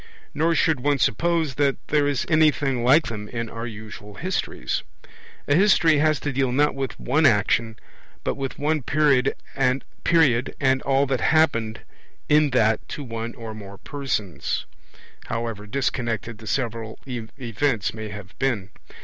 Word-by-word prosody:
Nor 165 Hz, +1 st, +2 dB
should 160 Hz, -2 st, +2 dB
one 145 Hz, +2 st, +1 dB
suppose 160 Hz, +4 st, +1 dB
that 140 Hz, -2 st, +3 dB
there 145 Hz, -1 st, +3 dB
is 140 Hz, -3 st, 0 dB
anything 145 Hz, -5 st, +2 dB
like 145 Hz, +6 st, +5 dB
them 105 Hz, -2 st, -6 dB
in 115 Hz, -1 st, -4 dB
our 115 Hz, +1 st, -5 dB
usual 105 Hz, -2 st, -9 dB
histories. 185 Hz, -, -2 dB, 0.7 s
A 145 Hz, -, +3 dB
history 165 Hz, -4 st, +5 dB
has 155 Hz, -1 st, +3 dB
to 145 Hz, -, -2 dB
deal 130 Hz, -1 st, +1 dB
not 145 Hz, +4 st, +3 dB
with 135 Hz, -2 st, -4 dB
one 150 Hz, +4 st, +3 dB
action, 110 Hz, 0 st, +2 dB, 0.5 s
but -, -, 0 dB
with 135 Hz, -1 st, -5 dB
one 150 Hz, +1 st, 0 dB
period 140 Hz, -1 st, +2 dB, 0.2 s
and 130 Hz, +1 st, +1 dB, 1.0 s
all 135 Hz, 0 st, +2 dB
that 130 Hz, -2 st, -1 dB
happened 130 Hz, -9 st, +2 dB, 0.5 s
in 150 Hz, 0 st, +4 dB
that 110 Hz, -4 st, +1 dB
to 145 Hz, -, -5 dB
one 115 Hz, -2 st, -5 dB
or 115 Hz, -2 st, -7 dB
more 100 Hz, -2 st, -10 dB
persons, 110 Hz, -, -3 dB, 0.6 s
however 115 Hz, -2 st, -4 dB
disconnected 115 Hz, -3 st, -2 dB
the 110 Hz, -, -11 dB
several 115 Hz, -3 st, -2 dB
events 120 Hz, -1 st, -2 dB
may 110 Hz, -1 st, -6 dB
have 105 Hz, -2 st, -9 dB
been. 110 Hz, -8 st, -1 dB
130 Hz, 145 wpm, -24 LUFS, 110-145 Hz, 1.0 s, like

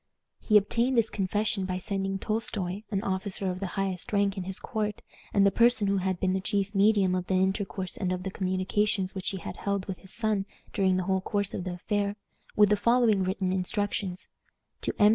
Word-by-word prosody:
He 215 Hz, -, +5 dB
obtained 235 Hz, +5 st, +2 dB
this 225 Hz, -1 st, +3 dB
confession 205 Hz, 0 st, 0 dB
by 185 Hz, -1 st, -2 dB
sending 195 Hz, +1 st, -2 dB
Tolstoi, 205 Hz, -2 st, -2 dB
an 200 Hz, -2 st, -1 dB
officer 190 Hz, -1 st, -2 dB
of 180 Hz, -, -5 dB
the 195 Hz, -, -2 dB
highest 195 Hz, +3 st, -2 dB
rank 200 Hz, -1 st, +2 dB
in 190 Hz, -3 st, -4 dB
his 190 Hz, 0 st, -2 dB
court, 210 Hz, -1 st, -3 dB, 0.3 s
and 200 Hz, -1 st, +4 dB
the 200 Hz, -, +5 dB
person 235 Hz, +1 st, +4 dB
who 200 Hz, 0 st, +2 dB
had 185 Hz, -1 st, -1 dB
been 185 Hz, -1 st, +1 dB
the 190 Hz, -, 0 dB
chief 200 Hz, 0 st, -1 dB
medium 200 Hz, -2 st, +4 dB
of 180 Hz, -1 st, -1 dB
the 190 Hz, -, +1 dB
intercourse 190 Hz, 0 st, -1 dB
and 185 Hz, -2 st, -1 dB
of 180 Hz, 0 st, -2 dB
the 190 Hz, -, -3 dB
communications 190 Hz, +1 st, 0 dB
which 190 Hz, -1 st, -2 dB
he 195 Hz, -, -3 dB
had 175 Hz, -, -7 dB
held 200 Hz, -2 st, -1 dB
with 190 Hz, -2 st, -5 dB
his 190 Hz, -, -8 dB
son 215 Hz, -3 st, 0 dB, 0.3 s
during 190 Hz, -2 st, +2 dB
the 185 Hz, -, 0 dB
whole 190 Hz, +1 st, +1 dB
course 200 Hz, 0 st, -1 dB
of 185 Hz, -, -4 dB
the 180 Hz, -, -3 dB
affair, 200 Hz, +3 st, -1 dB, 0.4 s
with 210 Hz, -1 st, +6 dB
the 210 Hz, -, +4 dB
following 235 Hz, -3 st, +3 dB
written 185 Hz, 0 st, -1 dB
instructions: 190 Hz, -1 st, -2 dB, 0.5 s
"To -, -, 0 dB
M. 210 Hz, -1 st, +7 dB
195 Hz, 210 wpm, -28 LUFS, 185-210 Hz, 0.5 s, M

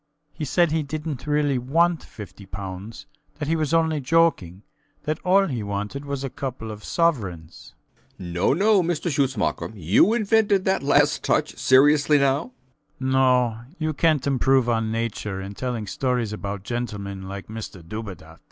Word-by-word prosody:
He 155 Hz, -, -4 dB
said 170 Hz, +3 st, +2 dB
he 160 Hz, 0 st, +1 dB
didnt 150 Hz, -1 st, -5 dB
really 145 Hz, -3 st, +1 dB
want 165 Hz, +7 st, +2 dB
50 105 Hz, -2 st, -11 dB
pounds; 95 Hz, +4 st, -7 dB, 0.3 s
that 150 Hz, -1 st, -4 dB
he 165 Hz, -, +1 dB
was 155 Hz, -2 st, -1 dB
only 160 Hz, -2 st, +2 dB
joking; 130 Hz, -, +1 dB, 0.4 s
that 155 Hz, 0 st, -2 dB
all 195 Hz, +1 st, +4 dB
he 125 Hz, -, -3 dB
wanted 105 Hz, +7 st, -4 dB
was 140 Hz, -1 st, -4 dB
a 135 Hz, -, -2 dB
couple 125 Hz, -5 st, -5 dB
of 105 Hz, -1 st, -9 dB
sovereigns. 100 Hz, -, -2 dB, 0.4 s
B. 95 Hz, -, -10 dB
B. 90 Hz, -, -6 dB
No, 90 Hz, -, +2 dB
no, 200 Hz, +4 st, +4 dB
Mr 175 Hz, 0 st, -1 dB
Schutzmacher. 135 Hz, -2 st, 0 dB
You 100 Hz, -, +3 dB
invented 210 Hz, -3 st, +2 dB
that 190 Hz, 0 st, +1 dB
last 140 Hz, -, +3 dB
touch. -, -, +1 dB
Seriously, 145 Hz, +3 st, +5 dB
now? 140 Hz, 0 st, +2 dB, 0.5 s
SCHUTZMACHER. 130 Hz, 0 st, -3 dB
No. 125 Hz, -3 st, +3 dB, 0.2 s
You 155 Hz, -1 st, -1 dB
cant 155 Hz, -2 st, +2 dB
improve 135 Hz, -2 st, +2 dB
on 115 Hz, -2 st, 0 dB
Nature 110 Hz, -3 st, -3 dB
in 95 Hz, +1 st, -6 dB
telling 120 Hz, -1 st, -3 dB
stories 120 Hz, +1 st, -1 dB
about 100 Hz, -1 st, -5 dB
gentlemen 100 Hz, -5 st, -5 dB
like 100 Hz, 0 st, -6 dB
Mr 105 Hz, -6 st, -8 dB
Dubedat. 90 Hz, -6 st, -8 dB
130 Hz, 160 wpm, -24 LUFS, 105-155 Hz, 0.5 s, Seriously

